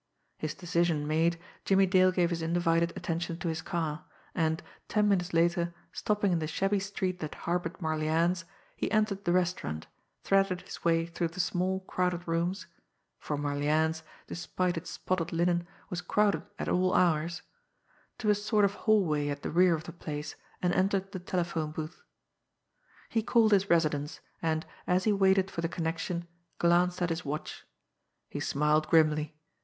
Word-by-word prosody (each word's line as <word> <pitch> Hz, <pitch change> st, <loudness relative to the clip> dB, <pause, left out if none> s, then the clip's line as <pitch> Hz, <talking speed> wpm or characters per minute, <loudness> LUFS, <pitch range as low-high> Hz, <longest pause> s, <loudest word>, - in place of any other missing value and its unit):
His 155 Hz, -1 st, -3 dB
decision 170 Hz, -4 st, 0 dB
made, 165 Hz, +2 st, +2 dB, 0.2 s
Jimmie 195 Hz, 0 st, +4 dB
Dale 185 Hz, 0 st, +5 dB
gave 180 Hz, -1 st, +1 dB
his 170 Hz, -1 st, -2 dB
undivided 165 Hz, 0 st, +2 dB
attention 170 Hz, 0 st, -3 dB
to 175 Hz, 0 st, -3 dB
his 160 Hz, 0 st, -2 dB
car, 160 Hz, -2 st, -3 dB, 0.3 s
and 160 Hz, 0 st, 0 dB, 0.2 s
ten 210 Hz, -1 st, +2 dB
minutes 190 Hz, -2 st, +1 dB
later, 170 Hz, +1 st, +2 dB, 0.2 s
stopping 210 Hz, -3 st, +1 dB
in 170 Hz, -, +2 dB
the 155 Hz, -, -2 dB
shabby 195 Hz, +6 st, +1 dB
street 190 Hz, -2 st, -3 dB
that 155 Hz, -2 st, -5 dB
harboured 175 Hz, 0 st, -1 dB
Marlianne's, 160 Hz, +2 st, +1 dB, 0.3 s
he -, -, -2 dB
entered 215 Hz, -2 st, +1 dB
the 175 Hz, -, +2 dB
restaurant, 175 Hz, -, 0 dB, 0.4 s
threaded 195 Hz, -2 st, +2 dB
his -, -, -10 dB
way 165 Hz, -1 st, +3 dB
through 170 Hz, 0 st, -2 dB
the 165 Hz, +3 st, -10 dB
small 185 Hz, +1 st, 0 dB
crowded 180 Hz, -2 st, -1 dB
rooms 170 Hz, +4 st, -1 dB, 0.5 s
for 150 Hz, -, -3 dB
Marlianne's, 150 Hz, +3 st, +1 dB, 0.2 s
despite 180 Hz, +1 st, -2 dB
its 165 Hz, +1 st, -5 dB
spotted 175 Hz, -2 st, -2 dB
linen, 175 Hz, +1 st, +1 dB, 0.2 s
was 180 Hz, -1 st, -2 dB
crowded 205 Hz, +3 st, +2 dB, 0.2 s
at -, -, -4 dB
all 185 Hz, 0 st, +2 dB
hours 165 Hz, -1 st, +2 dB, 0.7 s
to 215 Hz, -3 st, +2 dB
a -, -, +6 dB
sort 210 Hz, 0 st, +2 dB
of 200 Hz, -, 0 dB
hallway 180 Hz, -10 st, +2 dB
at 145 Hz, 0 st, -4 dB
the -, -, -3 dB
rear 175 Hz, 0 st, +5 dB
of 160 Hz, -, -6 dB
the 170 Hz, -, -8 dB
place, 150 Hz, -3 st, -5 dB, 0.3 s
and 180 Hz, 0 st, +2 dB
entered 195 Hz, +1 st, +1 dB
the 190 Hz, -, -5 dB
telephone 175 Hz, -4 st, -2 dB
booth. 155 Hz, +2 st, -6 dB, 1.1 s
He 225 Hz, -, +1 dB
called 220 Hz, 0 st, +3 dB
his 200 Hz, -1 st, +3 dB
residence, 155 Hz, -3 st, +1 dB, 0.2 s
and, 160 Hz, -1 st, 0 dB, 0.2 s
as 180 Hz, +1 st, +2 dB
he 215 Hz, -, +3 dB
waited 190 Hz, -1 st, +3 dB
for 170 Hz, -, -3 dB
the 165 Hz, -, -1 dB
connection, 170 Hz, +1 st, -3 dB, 0.3 s
glanced 175 Hz, +1 st, +3 dB
at 175 Hz, -, 0 dB
his 165 Hz, +2 st, -2 dB
watch. 150 Hz, +2 st, -5 dB, 0.6 s
He -, -, -4 dB
smiled 150 Hz, +2 st, +2 dB
grimly. 155 Hz, -1 st, +3 dB
175 Hz, 165 wpm, -30 LUFS, 160-185 Hz, 1.1 s, a